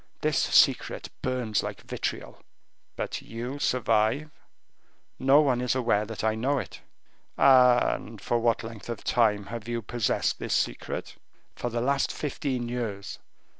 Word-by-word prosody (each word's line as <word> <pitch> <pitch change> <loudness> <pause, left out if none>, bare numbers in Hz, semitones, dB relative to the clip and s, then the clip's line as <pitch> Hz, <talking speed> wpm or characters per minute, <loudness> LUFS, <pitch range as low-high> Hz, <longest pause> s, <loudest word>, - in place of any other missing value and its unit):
This - - +1
secret - - +3
burns 125 -5 0
like - - -6
vitriol." - - -5 0.5
"But - - -4
you 120 +5 -6
survive?" 120 +4 +1 0.9
"No 135 +3 +6
one 130 -5 +1
is 125 0 0
aware 115 -5 +1
that 110 -1 -6
I 110 0 +2
know 130 +6 0
it." - - -6 0.6
"And 125 -4 +4
for 120 +4 0
what 115 0 +1
length 115 0 -9
of 115 -3 -5
time 105 -4 +2
have 115 +2 -7
you 120 -1 -3
possessed 120 +1 0
this - - -1
secret?" - - -3 0.4
"For 120 - -3
the 120 0 -2
last 140 +2 +1
fifteen 135 -4 -3
years." 115 -5 -4
120 Hz, 140 wpm, -27 LUFS, 110-130 Hz, 0.9 s, No